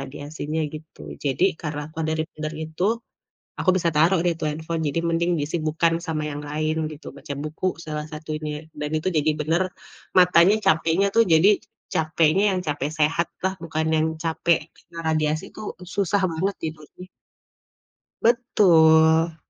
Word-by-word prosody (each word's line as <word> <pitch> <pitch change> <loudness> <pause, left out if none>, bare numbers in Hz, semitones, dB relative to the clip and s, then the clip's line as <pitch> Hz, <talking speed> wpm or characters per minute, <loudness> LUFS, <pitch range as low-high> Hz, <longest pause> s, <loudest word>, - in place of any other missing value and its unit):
radiasinya, 145 +3 -5
gitu. 155 +1 -11 0.2
Jadi, 140 +6 +1 0.2
karena 150 -2 -4
apa 160 - -5
dari 160 0 0
dari - - -65
tidur 155 0 -4
itu, 160 +4 -4 0.8
aku 185 - +1
bisa 170 -2 +1
taruh 170 +5 +4
deh 175 - +3
tuh 155 - -1
handphone, 160 +2 -3
jadi 145 +4 -1
mending 170 +1 +1
disibukan 160 +2 0
sama 155 -2 -2
yang 145 +1 -5
lain 155 +1 -1 0.2
gitu, 150 - -11
baca 140 0 -7
buku 155 +4 -3 0.2
salah 150 -1 -4
satunya 155 0 -5
dan 150 0 -3
itu 155 - -3
jadi 155 +1 +2
bener 160 +4 +1 0.5
matanya 180 +2 +6
capeknya 160 +4 +3
tuh 230 - +7
jadi 170 +6 +6 0.4
capeknya 160 +3 +2
yang - - 0
capek 145 -1 -1
sehatlah, 170 +4 0
bukan 160 -1 -2
yang 155 0 +2 0.2
capek 165 0 +2 0.2
kena 170 -1 -12
radiasi 155 0 0
tuh 215 - -7 0.3
susah 200 0 +1
banget 190 +5 -1
tidurnya. 160 +3 -8 1.1
Betul. 165 -8 +4
160 Hz, 150 wpm, -23 LUFS, 155-170 Hz, 1.1 s, tuh